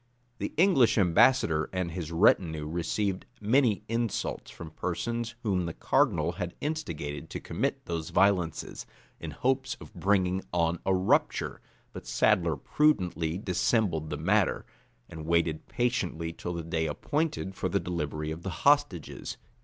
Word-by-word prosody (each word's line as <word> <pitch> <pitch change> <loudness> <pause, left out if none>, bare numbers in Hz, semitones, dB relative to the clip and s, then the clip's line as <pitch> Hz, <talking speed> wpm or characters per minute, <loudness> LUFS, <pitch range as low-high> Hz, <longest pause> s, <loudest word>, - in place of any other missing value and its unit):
The - - -3
English 150 - +5
ambassador 90 -4 +4
and 90 -2 -2
his 85 -1 -5
retinue 80 -3 +3
received 95 +4 -2
many 115 0 +2
insults 115 -1 -2
from 80 -2 -9
persons 115 +8 -3
whom 95 -5 0
the 85 - -5
cardinal - - +2
had 90 -1 -5
instigated 80 - -4
to - - -5
commit - - -2
those 85 -2 -3
violences, 95 -4 +1 0.3
in - - -6
hopes 130 +1 0
of - - -13
bringing 95 0 +1
on 85 -1 +1
a 95 - +4
rupture; 95 +1 +1 0.3
but - - -9
Sadler 85 -3 +2
prudently 90 - +1
dissembled 90 -4 0
the - - -3
matter, - - +1 0.4
and 80 -1 -8
waited 85 -2 +1
patiently 90 -9 -1
till 90 +1 -5
the 85 - -4
day 80 -1 -1
appointed 145 - -2
for - - -2
the - - +1
delivery 75 -3 -3
of 80 +2 -6
the 95 - -4 0.2
hostages. 145 - +1
90 Hz, 140 wpm, -29 LUFS, 80-115 Hz, 0.4 s, English